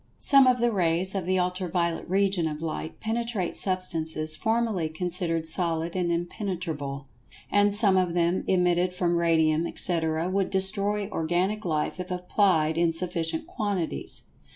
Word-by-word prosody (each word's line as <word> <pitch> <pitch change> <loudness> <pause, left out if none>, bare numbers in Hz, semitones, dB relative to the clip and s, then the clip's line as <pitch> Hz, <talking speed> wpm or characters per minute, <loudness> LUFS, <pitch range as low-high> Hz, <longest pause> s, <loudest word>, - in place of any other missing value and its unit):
Some 275 -2 +6
of 250 -1 +3
the 240 0 +2
rays 180 -1 +2
of 190 -3 -3
the 185 0 +1
Ultra 180 0 -2
violet 170 -1 -2
region 190 -3 +1
of 150 -1 -5
Light 160 0 -5
penetrate 225 -4 -2
substances 160 -4 -1
formerly 220 -3 -1
considered 165 -1 -2
solid 165 0 -1
and 175 -2 0
impenetrable. 170 -6 -4 0.5
And 205 0 +3
some 205 -3 +4
of 185 -1 +2
them[Pg 175 +1 0
129] 185 - +3
emitted 180 0 +1
from 175 -1 0
Radium, 165 -1 +2
etc., 160 -2 0
would 190 +1 0
destroy 200 +1 +3
organic 180 +5 -1
life 155 +1 -2
if 180 0 -6
applied 180 -3 +1
in 170 -1 +3
sufficient 170 - -2
quantities. 205 - -4
180 Hz, 150 wpm, -26 LUFS, 165-195 Hz, 0.5 s, Some